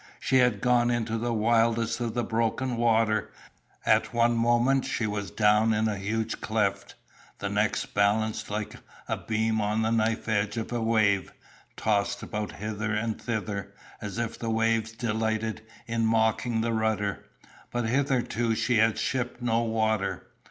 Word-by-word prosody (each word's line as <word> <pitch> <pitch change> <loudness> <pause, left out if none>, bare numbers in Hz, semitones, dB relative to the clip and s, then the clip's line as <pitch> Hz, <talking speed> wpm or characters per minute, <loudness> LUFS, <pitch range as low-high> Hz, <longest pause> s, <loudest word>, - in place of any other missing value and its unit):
She 130 - +2
had 125 -5 +3
got 120 -1 +3
into 115 -2 -1
the 120 +1 -1
wildest 115 +1 +2
of 120 -2 -3
the 120 - 0
broken 115 +3 -1
water; 110 -2 +2 0.5
at - - +2
one 120 0 +3
moment 120 +3 +3
she 115 - -2
was 105 -2 -3
down 105 +3 +3
in 110 +1 +1
a 105 -2 -2
huge 110 +3 -2
cleft, 105 -3 -1 0.4
the - - -3
next - - 0
balanced 110 +2 +1
like 105 0 -3 0.3
a - - 0
beam 110 0 -1
on 105 +2 0
the 110 - +1
knife 115 0 0
edge 105 -1 0
of 115 - -3
a 120 -1 -1
wave, 110 -5 +2 0.5
tossed 100 -2 0
about 105 -1 -4
hither 105 +1 -3
and 110 +1 -2
thither, 100 -4 -4 0.3
as 100 0 -5
if 115 -1 -3
the 115 - -3
waves 115 0 +1
delighted 110 -1 -2 0.2
in 115 0 -1
mocking 110 +1 +1
the 115 0 0
rudder; 110 -2 -1 0.5
but 120 -1 -2
hitherto 120 -3 +1
she 115 +2 +1
had 110 0 +3
shipped 125 -2 -2
no 115 -2 +1
water. 110 -3 -1
110 Hz, 160 wpm, -27 LUFS, 110-115 Hz, 0.5 s, had